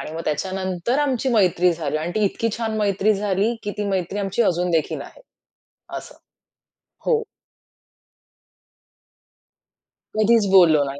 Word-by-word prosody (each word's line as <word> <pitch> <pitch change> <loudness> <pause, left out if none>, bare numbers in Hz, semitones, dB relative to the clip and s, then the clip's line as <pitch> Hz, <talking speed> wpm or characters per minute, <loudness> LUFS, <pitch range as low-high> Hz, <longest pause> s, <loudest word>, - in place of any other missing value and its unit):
आणि 155 - -7
मग 165 - -5
त्याच्यानंतर 185 - -2
आमची 270 -3 0
मैत्री 180 -5 +3
झाली 155 -3 -3
आणि 170 +3 -4
ती 215 -1 +2
इतकी 230 +3 0
छान 220 -1 -2
मैत्री 205 +1 +2
झाली, 205 +3 0
की 205 - -3
ती 205 - -1
मैत्री 190 +1 -2
आमची 200 +3 0
अजून 180 -2 +1
देखील 160 -2 0
आहे. - - -14 0.8
असं. - - -10 0.9
हो. 455 -2 +2 2.9
कधीच 215 0 +4
बोललो 165 -6 +6
नाही. 140 0 -5
195 Hz, 130 wpm, -22 LUFS, 175-215 Hz, 2.9 s, बोललो